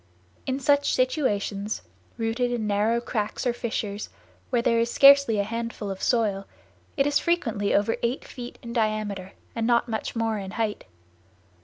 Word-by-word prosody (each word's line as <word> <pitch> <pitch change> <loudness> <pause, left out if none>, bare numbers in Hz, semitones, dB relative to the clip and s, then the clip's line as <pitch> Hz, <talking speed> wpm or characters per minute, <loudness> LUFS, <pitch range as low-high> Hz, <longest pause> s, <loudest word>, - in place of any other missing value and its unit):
In 265 +1 -1
such 285 +1 +3
situations, 215 -6 0 0.3
rooted 235 +2 0
in 235 -3 -1
narrow 210 +3 +2
cracks 220 0 -3
or 245 - +2
fissures, 215 -3 -3 0.4
where 235 -1 +1
there 230 -1 +3
is 230 0 +1
scarcely 280 -4 +7
a 200 - +2
handful 230 -1 -4
of 190 - -7
soil, 205 -5 +1 0.5
it 275 - +3
is 290 0 +3
frequently 230 -13 0
over 205 +3 +2
eight 240 +3 -1
feet 245 -2 -8
in 235 0 -6
diameter 215 -4 -1 0.2
and 230 -1 0
not 240 0 +3
much 220 0 -3
more 225 -2 0
in 195 -1 -6
height. 220 -2 -2
230 Hz, 160 wpm, -26 LUFS, 210-245 Hz, 0.5 s, scarcely